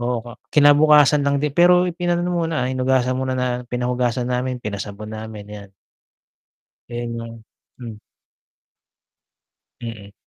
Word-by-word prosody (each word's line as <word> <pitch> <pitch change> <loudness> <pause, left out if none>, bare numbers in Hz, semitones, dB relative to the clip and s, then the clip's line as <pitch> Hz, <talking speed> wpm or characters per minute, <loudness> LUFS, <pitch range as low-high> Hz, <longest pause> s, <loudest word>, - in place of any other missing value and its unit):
oo 120 -1 -2 0.2
kinabukasan 150 0 +5
lang 140 0 +1
din 145 0 -1
pero 180 +2 +5
ipinaano 175 0 -1
muna 165 -6 -1
hinugasan 130 0 +1
muna 125 -1 -2
pinahugasan 125 0 -1
namin, 125 +1 -2
pinasabon 105 -1 -7
namin 110 -1 -8
yan. 100 -1 -13 1.2
Ayun 120 0 -4
ang 115 0 -9 0.4
hmm. 115 -4 -9 1.8
Mm. 110 -4 -8
125 Hz, 105 wpm, -21 LUFS, 115-145 Hz, 1.8 s, kinabukasan